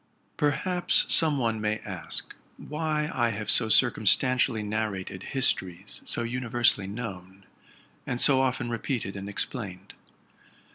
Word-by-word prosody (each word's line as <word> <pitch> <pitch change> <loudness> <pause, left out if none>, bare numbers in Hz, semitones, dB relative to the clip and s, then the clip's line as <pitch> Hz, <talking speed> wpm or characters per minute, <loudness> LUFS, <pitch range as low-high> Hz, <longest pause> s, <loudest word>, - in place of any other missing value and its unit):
Perhaps 175 +5 +2
some 155 -3 +4
one 115 -4 -1
may 105 0 0
ask - - -5 0.2
why 150 0 -2
I 120 -2 +1
have 105 -1 -2
so 115 -2 +2
circumstantially 125 +1 +3
narrated 105 -3 -3
histories 95 -7 -1
so 120 - -1
univers 120 0 +2
sally 95 -1 -7
known, 100 -3 -8 0.6
and 125 - -2
so 130 -1 +4
often 125 -2 -1
re 115 - -2
peated 110 -6 -3
and 100 +1 -6
explained. 100 -3 -5
115 Hz, 130 wpm, -27 LUFS, 100-130 Hz, 0.6 s, some